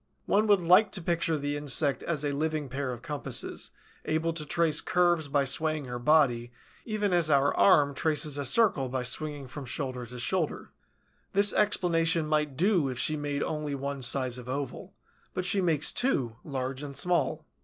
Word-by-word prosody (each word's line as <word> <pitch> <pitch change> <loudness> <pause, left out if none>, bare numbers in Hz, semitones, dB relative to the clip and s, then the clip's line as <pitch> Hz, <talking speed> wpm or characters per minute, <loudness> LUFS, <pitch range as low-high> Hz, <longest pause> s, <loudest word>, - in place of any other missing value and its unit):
One 210 +2 +2
would 205 -3 +4
like 185 +5 +5
to 190 - 0
picture 165 -2 0
the 145 0 -3
insect 145 0 +1
as 150 -3 -2
a 145 - 0
living 155 0 -2
pair 135 0 -3
of 120 -1 -8
compasses, 145 -3 -3 0.3
able 160 +1 -1
to 155 -2 -5
trace 165 -1 +1
curves 175 -4 +1
by 140 0 +1
swaying 155 +2 0
her 125 -1 -5
body, 120 -4 +2 0.3
even 210 -4 -1
as 170 -3 +2
our 140 -1 +3
arm 145 -7 +4
traces 150 -1 0
a - - -2
circle 140 - +3
by 130 0 -2
swinging 145 +2 -1
from 140 +2 -8
the 125 -1 -5
shoulder. 160 +6 -2 0.6
This 200 0 +5
explanation 165 -5 +2
might 150 -3 -1
do 180 -5 +2
if 125 - -5
she 155 - 0
made 145 -1 -3
only 150 -2 -3
one 140 0 -5
size 125 0 +1
of 125 0 -10
oval; 135 -1 -5 0.4
but 185 - -2
she 195 +1 +1
makes 160 -5 +1
two, 130 - 0
large 130 -2 -4
and 140 -2 -7
small. 160 -1 0
150 Hz, 175 wpm, -28 LUFS, 135-170 Hz, 0.6 s, like